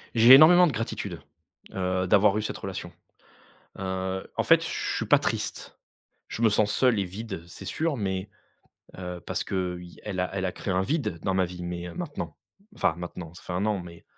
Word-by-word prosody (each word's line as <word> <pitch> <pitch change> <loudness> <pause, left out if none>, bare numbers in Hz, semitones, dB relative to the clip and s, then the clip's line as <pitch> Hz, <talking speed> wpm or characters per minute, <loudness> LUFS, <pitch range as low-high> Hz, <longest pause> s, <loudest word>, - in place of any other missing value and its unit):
J'ai 115 +3 +9
énormément 170 +6 +9
de - - 0
gratitude, 115 -2 -4 0.5
heu, 95 0 -1
d'avoir 100 +2 +4
eu 110 - 0
cette 105 - -4
relation. 90 -2 -6 0.9
Heu, 95 0 -3
en - - +2
fait, - - +5
je - - -3 0.3
suis - - -2
pas - - +6
triste. - - -3 0.5
Je 115 - -5
me 115 - +6
sens 105 0 +2
seul 125 -5 +3
et 100 - +1
vide, 95 -1 -6
c'est 85 - -10
sûr, 160 -2 -1
mais 95 -2 -3 0.7
heu, 90 -1 -6
parce - - -2
que 90 -2 -2
il 90 -1 -12
elle 95 -3 -3
a 90 - -1
elle 95 -1 -2
a 90 - -2
créé 95 - -4
un 95 - +2
vide 135 - -1
dans 95 - 0
ma 95 -1 +3
vie, 90 0 -8
mais 85 0 -5
maintenant, - - -5 0.4
enfin - - +1
maintenant, 85 -1 -7
ça - - -13
fait - - -6
1 95 - 0
an, 105 -3 0
mais 85 -1 -12
95 Hz, 205 wpm, -27 LUFS, 90-105 Hz, 0.9 s, J'ai